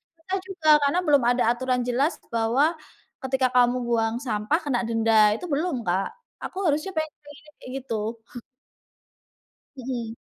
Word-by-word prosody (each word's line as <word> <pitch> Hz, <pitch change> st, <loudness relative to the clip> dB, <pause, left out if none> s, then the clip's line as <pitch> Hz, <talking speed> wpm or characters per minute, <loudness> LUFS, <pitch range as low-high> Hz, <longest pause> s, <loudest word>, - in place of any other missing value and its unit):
pernah 370 Hz, +4 st, -4 dB
juga 350 Hz, -5 st, -5 dB, 0.2 s
karena 340 Hz, +5 st, +1 dB
belum 285 Hz, -6 st, +3 dB
ada 245 Hz, +1 st, +3 dB
aturan 250 Hz, 0 st, -1 dB
jelas 255 Hz, +6 st, +1 dB, 0.2 s
bahwa, 245 Hz, +8 st, +1 dB, 0.5 s
ketika 265 Hz, 0 st, +1 dB
kamu 245 Hz, 0 st, +4 dB
buang 225 Hz, -1 st, +1 dB
sampah 235 Hz, +4 st, -1 dB
kena 270 Hz, -6 st, -1 dB
denda 225 Hz, -2 st, +4 dB
itu 360 Hz, -, -7 dB
belum, 315 Hz, +1 st, -1 dB
Kak, 185 Hz, +2 st, +1 dB, 0.4 s
aku -, -, -7 dB
harusnya 305 Hz, +6 st, 0 dB
pengen 315 Hz, -3 st, -3 dB, 0.4 s
kayak 255 Hz, -, -11 dB
gitu. 225 Hz, -2 st, -4 dB, 1.6 s
Hmm. 240 Hz, -3 st, -4 dB
255 Hz, 135 wpm, -25 LUFS, 230-305 Hz, 1.6 s, kamu